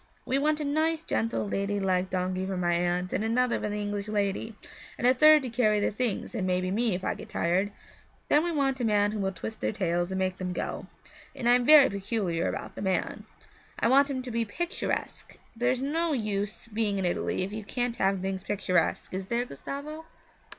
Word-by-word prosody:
We 265 - +1
want 305 +1 +1
a 300 - -2
nice, 315 +2 +1
gentle, 225 -7 -1
lady 200 +1 -1
like 185 -1 +1
donkey 185 0 -1
for 190 -1 -3
my 175 -1 +1
aunt, 175 +1 0
and - - 0
another 235 +2 +1
for 210 - -2
the 210 0 -3
English 205 0 -3
lady, 210 +1 -1 0.4
and - - -2
a 250 - +6
third 305 +2 +7
to 255 - -3
carry 215 -3 +2
the - - +1
things 225 0 -2
and 200 -6 -1
maybe 185 0 0
me, 220 -1 +1
if 185 - -5
I - - 0
get - - -10
tired. 185 +4 0 0.6
Then 295 - +4
we 345 - -1
want 275 -4 0
a - - -1
man 205 -2 +3
who 215 - -4
will 190 -1 0
twist 195 +5 -7
their - - 0
tails 175 -3 -1
and 190 - -2
make 185 -1 -1
them 180 -1 -3
go; - - -4 0.5
and 240 - -2
I 240 - +7
am 245 0 +4
very 300 -1 +9
particular 195 -4 -1
about - - -5
the - - -8
man. 190 -2 -1 0.5
I 230 - +2
want 280 +2 +5
him 260 -2 -3
to 250 - -6
be 230 0 0
picturesque 345 - -4 0.2
there's 245 +2 0
no 325 +3 0
use 210 -3 -2
being 215 -2 -1
in 190 - -1
Italy 175 +1 -1
if 195 +2 -5
you 215 0 -5
can't 245 +3 -2
have 195 -1 +1
things 190 0 -3
picturesque, 185 -5 0
is 190 0 -4
there, 240 +2 0
Gustavo?' 285 - -7
210 Hz, 215 wpm, -28 LUFS, 190-250 Hz, 0.6 s, very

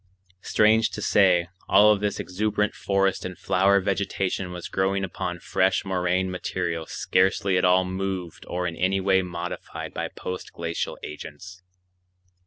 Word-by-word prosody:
Strange 110 +1 +3
to - - -7
say, 90 -4 +4 0.2
all 105 +2 +7
of 105 - +2
this 105 -1 -1
exuberant 105 +2 -1
forest 95 -1 0
and 90 -1 -6
flower 95 +2 +3
vegetation 95 -1 -1
was 90 -1 -6
growing 95 +1 0
upon 90 -1 -4
fresh 95 +3 +1
moraine 95 0 0
material 85 -3 -3
scarcely 95 +1 +1
at 90 - +3
all 90 +1 +4
moved 95 -2 -4
or 90 +1 -2
in 85 -2 -3
any 95 +3 +1
way 95 0 +3
modified 90 -1 -6
by - - -3
post 90 0 -7
glacial 85 0 -3
agents. 80 +5 -9
95 Hz, 145 wpm, -25 LUFS, 90-95 Hz, 0.2 s, all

